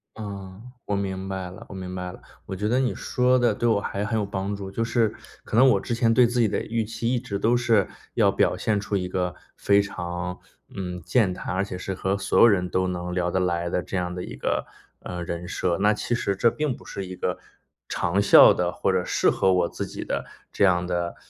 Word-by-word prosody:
嗯， 100 -2 -8 0.2
我 100 - -1
明 95 -1 -3
白 95 -2 -4
了， 90 - -11
我 - - -8
明 90 -1 -6
白 90 0 -4
了。 - - -13 0.2
我 95 - -5
觉 105 +3 -2
得 125 +3 +2
你 130 -2 +1
说 125 0 +2
得 120 -3 +3
对 120 - 0
我 110 -3 +3
还 100 0 -3
很 110 +1 -1
有 - - 0
帮 100 0 -3
助， 100 -1 -6
就 105 +4 -2
是， 115 -1 +1 0.3
可 - - -2
能 130 +3 +7
我 100 -6 +3
之 120 - -2
前 115 -1 +3
对 120 +1 +6
自 120 +1 -1
己 115 - +4
的 105 - -1
预 115 0 -1
期， 115 +2 -2
一 125 - +1
直 105 -5 -4
都 120 +4 +3
是 115 -5 +3 0.3
要 - - +4
表 - - +2
现 105 -2 0
出 105 0 -3
一 90 -2 -1
个 90 -1 -1 0.2
非 100 0 +4
常， 90 -2 -5 0.4
嗯， 90 -2 -5
健 95 +2 +2
谈， 90 - -5
而 95 +1 0
且 95 - -6
是 95 +1 -4
和 95 +1 -1
所 100 - -1
有 - - +9
人 90 -5 +2
都 95 +1 +1
能 90 0 -3
聊 90 -1 0
得 95 - +1
来 85 -1 0
的 90 - 0
这 90 +3 -4
样 90 0 -2
的 90 0 -5
一 - - -7
个， - - -2 0.3
呃， 90 -1 -6
人 85 +1 -5
设， 90 -1 -1
那 105 +1 +4
其 120 - -2
实 100 -4 0
这 115 +4 +3
并 150 -2 -1
不 - - -16
是 95 -1 -6
一 90 - -7
个 - - -2 0.5
长 90 +3 0
效 100 - +8
的 - - 0
或 - - 0
者 - - +1
适 - - +2
合 95 - +2
我 90 -2 +2
自 - - -5
己 - - -6
的 - - -2 0.3
这 - - 0
样 90 -2 +4
的， 85 -1 -2
95 Hz, 265 characters per minute, -25 LUFS, 90-110 Hz, 0.5 s, 有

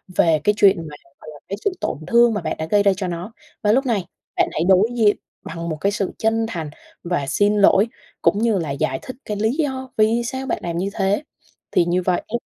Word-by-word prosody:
về 160 -3 +3
cái 210 - +3
chuyện 200 -1 +5
mà, 150 - -9 0.3
gọi - - -10
là, 145 - -13
cái 200 - -4
sự 410 - +3
tổn - - -2
thương 235 -1 +5
mà 205 - -2
bạn - - -3
đã 160 - -3
gây 205 +5 +2
ra 200 - +5
cho 190 -3 -2
nó. 175 +6 -5 0.3
Và 210 -1 +3
lúc 265 +4 +2
này 210 -8 0 0.3
bạn - - +2
hãy 160 - -1
đối 195 +4 +5
diện 210 -2 +4 0.3
bằng 170 0 -6
một 155 - -3
cái 200 - +2
sự 200 -2 -2
chân 225 0 +1
thành 165 -7 -4 0.3
và 170 -5 -1
xin 205 +9 +2
lỗi 200 +1 +5 0.3
cũng 205 - +3
như 225 -3 +2
là 160 -5 -2
giải 135 -1 -1
thích 255 - -8
cái 210 -1 -3
lý 220 +2 +1
do 265 -4 -2
vì 225 +2 +3
sao 260 +3 -4
bạn 260 - -2
làm 170 -1 -3
như 190 +3 -1
thế, 200 +7 0 0.5
thì 170 - +3
như 175 +1 +1
vậy 180 -1 0
á 240 - -4
205 Hz, 245 wpm, -21 LUFS, 175-225 Hz, 0.5 s, chuyện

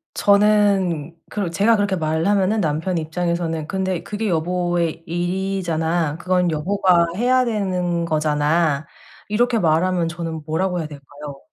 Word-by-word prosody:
저는 200 -6 +2
그렇 200 -5 -2
제가 205 +7 +3
그렇게 205 -2 0
말하면은 185 +6 +1
남편의 160 +2 -1
입장에서는 165 -1 -2
"근데 190 -2 -2
그게 215 +1 -3
여보의 175 -1 -1
일이잖아. 175 -3 -1
그건 180 0 +1
여보가 175 +2 +2
해야 255 +4 +2
되는 180 -6 -1
거잖아." 155 -1 +1 0.4
이렇게 235 +2 +1
말하면 170 +1 +2
저는 165 -1 -5
뭐라고 180 +3 -1
해야 160 - -3
될까요? 145 -1 -10
175 Hz, 310 characters per minute, -21 LUFS, 160-195 Hz, 0.4 s, 제가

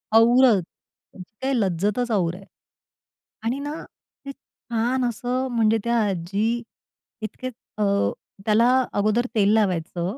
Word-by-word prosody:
औरचं, 235 -1 +6 0.5
त्याची 185 +2 -12
काही 270 +1 0
लज्जतचं 205 +6 0
और 175 -3 0
आहे 195 +2 -12 1.0
आणि 250 +5 -1
ना 290 +1 -4 0.5
ते 275 - -5
छान 245 -1 -3
असं 250 +3 -2
म्हणजे 225 -2 +3
त्या 235 0 +1
आजी 200 +7 -1 0.6
इतकेच 250 +4 -6 0.2
अ, 210 - +1 0.6
त्याला 220 +2 +4 0.3
अगोदर 215 +4 +1
तेल 205 -1 +4
लावायचं 185 -1 0
225 Hz, 120 wpm, -23 LUFS, 200-245 Hz, 1.0 s, औरचं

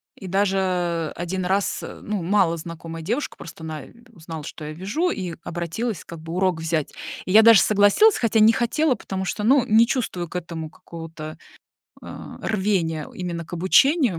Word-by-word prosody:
и 190 - -9
даже 185 -4 0
1 180 +2 -3
раз, 195 +2 0
э, - - -8
ну, 205 -4 -3
малознакомая 165 -3 -1
девушка, 235 - -2
просто 165 -1 -10
она, 155 -3 -5
э, - - -17 0.2
узнала, 160 -5 -8
что 155 0 -8
я 155 - -5
вяжу, 205 - -1
и 180 - -4
обратилась 175 +5 -3
как 170 - -10
бы 165 +1 -7
урок 185 -2 +1
взять. 160 -2 -1 0.3
И - - -3
я 220 +3 +8
даже 230 -3 +8
согласилась, 210 - +5
хотя 225 -2 +2
не 215 +1 +7
хотела, 255 +5 +1
потому 190 -3 -5
что, 210 - -3
ну, 260 +4 +5
не 220 +2 +5
чувствую 225 -8 -2
к 165 - -13
этому 165 -2 -5
какого-то, 165 -2 -9 0.7
а, - - -9
рвения 190 -7 0
именно 170 -2 -4
к - - -17
обучению. 210 - +3
185 Hz, 175 wpm, -23 LUFS, 165-210 Hz, 0.7 s, я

